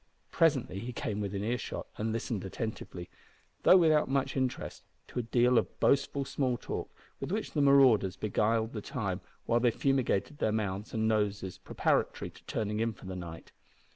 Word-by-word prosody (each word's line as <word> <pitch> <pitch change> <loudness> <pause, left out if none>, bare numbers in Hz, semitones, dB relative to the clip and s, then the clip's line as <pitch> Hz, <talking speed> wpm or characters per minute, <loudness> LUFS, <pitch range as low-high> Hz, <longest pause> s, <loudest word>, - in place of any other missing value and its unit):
Presently 145 - +2
he 120 +4 -5
came 105 -2 -3
within 100 0 -3
earshot, 120 +2 -3
and 110 +1 -2
listened 115 -2 -2
attentively, 95 -3 -5 0.5
though 185 - +8
without 155 -5 +4
much 135 0 0
interest, 130 -2 -2 0.3
to - - -3
a - - +2
deal 120 +1 +4
of - - -5
boastful 140 0 +2
small 130 -3 0
talk - - -5 0.3
with - - -4
which 215 +2 -2
the 150 - 0
marauders 130 -9 +5
beguiled 110 +2 0
the 105 - -4
time, 100 -8 -3 0.2
while 120 - +3
they 120 0 +4
fumigated 135 +1 0
their 110 - +2
mouths 105 -1 -2
and 110 0 +1
noses 105 -3 0
preparatory - - 0
to - - -18
turning 105 -1 -2
in 115 0 0
for 100 - -15
the 95 0 -5
night. 85 -2 -8
115 Hz, 170 wpm, -31 LUFS, 105-130 Hz, 0.5 s, though